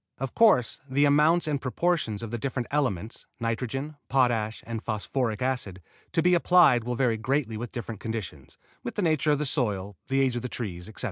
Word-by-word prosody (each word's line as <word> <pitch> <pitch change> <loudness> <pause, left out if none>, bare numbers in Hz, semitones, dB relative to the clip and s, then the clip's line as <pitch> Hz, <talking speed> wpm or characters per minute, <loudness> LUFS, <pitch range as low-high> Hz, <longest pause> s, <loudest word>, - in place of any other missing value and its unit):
Of 135 -1 -4
course 210 - +4
the 140 +3 +3
amounts 150 +4 +4
and 145 -3 -1
proportions 130 -6 0
of 115 - -5
the 120 - -3
different 130 -1 -3
elements 115 -8 -2
(nitrogen, 130 +6 -3
potash 120 -5 +1
and 115 -1 -4
phosphoric 110 +1 -2
acid) 125 -8 -2 0.3
to 165 - +2
be 180 +1 +4
applied 175 -8 +5
will 125 +1 -2
vary 120 -3 +1
greatly 125 0 -1
with 115 +1 -5
different 115 -3 -6
conditions, 105 - -6 0.2
with 120 - -6
the 205 - -1
nature 155 -2 +2
of 145 - +4
the 150 - -2
soil, 105 -8 -1
the 135 0 +2
age 130 -2 +1
of 120 - -2
the 125 - -4
trees, 95 -6 -5
etc. 110 - -10
125 Hz, 195 wpm, -27 LUFS, 110-145 Hz, 0.3 s, applied